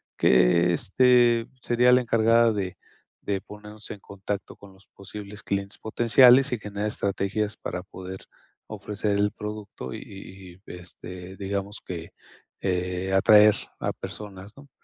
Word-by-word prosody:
que, 85 +8 +4
este, 120 +4 +3 0.2
sería 120 +1 +3
la 125 0 +5
encargada 115 -1 +3
de 95 -3 -4 0.4
de 100 -2 -2
ponernos 105 +1 -11
en 100 - -7
contacto 100 +1 -6
con 100 -1 -15
los 95 +1 -22
posibles 100 +1 -10
clientes 100 0 -3
potenciales 125 +4 +5
y 125 - -1
generar 105 0 -5
estrategias 100 +1 -2
para 90 - -5
poder 95 0 -9 0.5
ofrecer 105 0 -3
el 105 0 +1
producto 105 - -7
y - - -6 0.7
y, - - -8
este, 90 +1 -10
digamos 100 +1 -4
que, 85 -2 -7 0.5
eh, 90 0 -2
atraer 105 +2 +6 0.2
a - - -1
personas, 100 -1 -9
¿no? 140 0 -15
100 Hz, 135 wpm, -25 LUFS, 95-110 Hz, 0.7 s, atraer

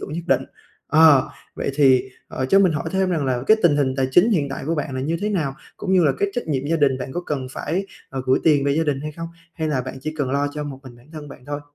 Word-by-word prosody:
tưởng - - -7
nhất 170 +1 -4
định. - - +2 0.5
Ờ, 155 -3 +6 0.3
vậy - - -2
thì, 130 -3 +4 0.2
ờ, 130 - -3
cho 195 - +5
mình 185 -4 +4
hỏi 150 - -3
thêm 190 -1 +1
rằng 155 -5 0
là 125 -2 -1
cái 220 - +6
tình 150 -4 +4
hình 130 -2 +1
tài 130 -1 +1
chính 190 - +5
hiện 150 -9 +1
tại 135 - -6
của 165 - 0
bạn 145 -3 -3
là 130 - -2
như 160 +5 -1
thế 210 - -1
nào? 155 -10 -1 0.2
Cũng 190 - -3
như 180 -3 +4
là 140 - +4
cái 200 - +1
trách 245 - -4
nhiệm 140 -2 -2
gia 165 +2 +1
đình 135 -3 +2
bạn 130 +1 -6
có 175 - -2
cần 135 -4 -3
phải, 180 +8 -3 0.2
ờ, 130 -1 -5
gửi 130 - +3
tiền 145 -3 +4
về 140 - +2
gia 160 +2 +1
đình 140 -2 -1
hay 150 +1 -5
không? 165 +2 -7 0.3
Hay 160 -1 -2
là 135 -4 0
bạn 130 +1 -7
chỉ 155 +3 -5
cần 135 -2 -1
lo 140 +1 0
cho 150 - -3
một 135 -2 -7
mình 125 -2 -12
bản 120 +3 -20
thân 150 -2 -8
bạn 130 - -13
thôi? 145 0 -4
145 Hz, 300 wpm, -22 LUFS, 135-165 Hz, 0.5 s, Ờ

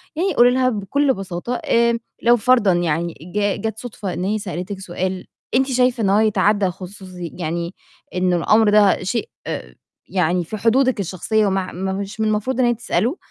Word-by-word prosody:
يعني 370 +5 0
قُولي 245 +1 +6
لها 255 0 +2
بكل 265 +6 +1
بساطة، 195 +4 -4
آمم، 235 0 +3 0.2
لو 240 +1 +5
فرضًا 235 -3 +4
يعني 170 -1 0 0.2
ج 205 -1 0
جات 220 0 -3
صُدفة 210 -6 -5
إن 180 - -3
هي 210 +3 0
سألتِك 185 0 -5
سؤال 185 0 -4 0.3
أنتِ 265 +1 +3
شايفة 250 -2 +2
إن 195 - +2
هو 200 +2 +4
يتعدى 210 -1 +2
الخصوصي 185 -1 -6
يعني 170 +1 -3 0.4
إن 180 0 +1
الأمر 215 +5 +4
ده 205 -3 +4
شيء 230 - -2 0.8
يعني 180 -1 +1
في 215 +6 -6
حدودِك 245 +3 +2
الشخصية 200 +3 0
مع 190 -1 -1
م 185 +3 -5
مش 200 +2 -6
من 220 - +1
المفروض 215 +5 -1
إن 255 - +4
هي 240 - +3
تسأله، 240 - -1
205 Hz, 175 wpm, -20 LUFS, 185-235 Hz, 0.8 s, قُولي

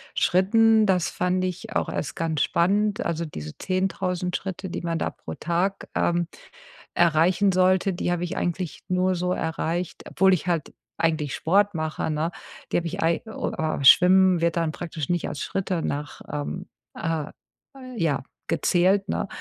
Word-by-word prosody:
Schritten, 220 +4 +4
das 180 -4 +2
fand 180 +1 0
ich 195 +5 -5
auch - - 0
erst 145 - -4
ganz 160 -3 -1
spannend. 205 +4 +1
Also, 170 0 -1
diese 75 - -8
10.000 185 -1 -1
Schritte, 190 -1 -5
die 180 - -4
man 170 -1 -2
da - - -2
pro - - -9
Tag, 180 +4 -1
ähm, 175 0 +1 0.7
erreichen 175 +4 +3
sollte, 185 +1 +3
die 175 - -2
habe 175 0 -1
ich 170 - -5
eigentlich 175 -1 -3
nur 185 0 +2
so 180 +1 -1
erreicht, 165 +1 -2
obwohl 190 +1 +4
ich 185 0 -1
halt 170 -4 -1 0.2
eigentlich 155 -4 0
Sport 200 +5 +2
mache, 160 -1 -2
ne? 155 +2 -1 0.4
Die - - +4
habe 170 -1 -1
ich 190 +4 -4
ei 165 +1 +2
oh, 220 - -4
aber 155 -3 -1
Schwimmen 185 +3 +7
wird 170 0 +1
dann 165 -2 0
praktisch 160 -4 -5
nicht 175 -1 -1
als 140 - -6
Schritte 185 0 -2
nach 145 -1 -4
ähm, 150 +5 -4 0.3
äh, 165 -3 -2 0.6
ja, 160 - 0 0.3
gezählt, 185 +4 +2
ne? - - -1
175 Hz, 165 wpm, -25 LUFS, 165-185 Hz, 0.7 s, Schwimmen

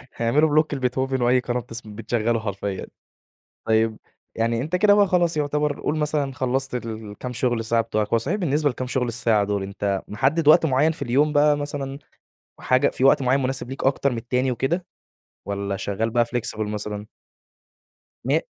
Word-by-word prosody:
هيعملوا 140 +7 +2
بلوك 155 0 +2
لبيتهوفن 130 0 -1
وأي 125 +1 +4
قناة 125 0 -2
بتس 115 -1 -8
بتشغله 115 +2 -2
حرفيًا. 100 -2 -4 0.8
طيب 110 0 +2 0.4
يعني 115 +1 0
أنت 155 +6 -2
كده 205 +2 +5
بقى 205 -1 +5
خلاص 175 -3 +1
يُعتبَر 150 0 -1
قل 155 - -1
مثلًا 150 -3 -1
خلّصت 130 +1 -1
الكام 110 +2 -6
شُغل 120 -1 0
ساعة 115 +1 +2
بتوعك، 110 -2 -1
هو - - +5
صحيح 145 - -1
بالنسبة 150 -5 +1
لكام 130 0 -4
شُغل 125 -1 -1
الساعة 115 -3 +1
دول 100 -1 -1
أنت 100 0 -2
محدّد 135 +8 0
وقت 155 - +7
معيّن 145 +2 +3
في 160 - -11
اليوم 140 +4 +2
بقى 145 0 +4
مثلًا، 145 -1 -4 0.6
حاجة 130 +2 +3
في 130 - -2
وقت 135 0 +5
معيّن 130 +2 +2
مناسب 130 -1 -2
ليك 135 - -5
أكتر 140 0 +2
من - - -3
التاني 125 +3 0
وكده، 165 +9 -1 0.6
والّا 100 -1 -3
شغال 100 +3 -2
بقى 120 0 +2
flexible 115 -2 -3
مثلًا؟ 105 0 -4 1.2
م - - +2
125 Hz, 170 wpm, -23 LUFS, 115-145 Hz, 1.2 s, وقت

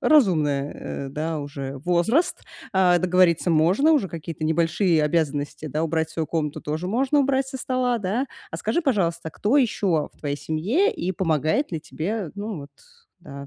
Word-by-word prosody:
разумное, 150 - +2
э, - - -6
да, 155 +3 -3
уже 140 -2 -6
возраст, 180 - +1 0.3
а, 185 -2 +4
договориться 180 -1 +3
можно. 180 - +4
Уже 275 -11 +2
какие-то 165 -1 -7
небольшие 165 +2 +2
обязанности, 150 -1 -1
да, 155 +3 -1
убрать 160 0 -1
свою 160 0 -2
комнату 150 -3 -2
тоже 155 +4 -3
можно, 265 +7 +2
убрать 270 -1 +1
со 265 - -6
стола, 255 -2 0
да? 215 +7 -1 0.2
А - - -4
скажи, 345 - -1
пожалуйста, 170 - 0
кто 215 - +1
ещё 195 - +1
в - - -29
твоей 145 -1 -3
семье, 200 - +1
и 185 +2 -3
помогает 160 - 0
ли 165 - -2
тебе, 180 +3 -4
ну 205 -2 -5
вот, 140 - -12 0.5
да, 140 -5 -9
170 Hz, 165 wpm, -24 LUFS, 155-220 Hz, 0.5 s, а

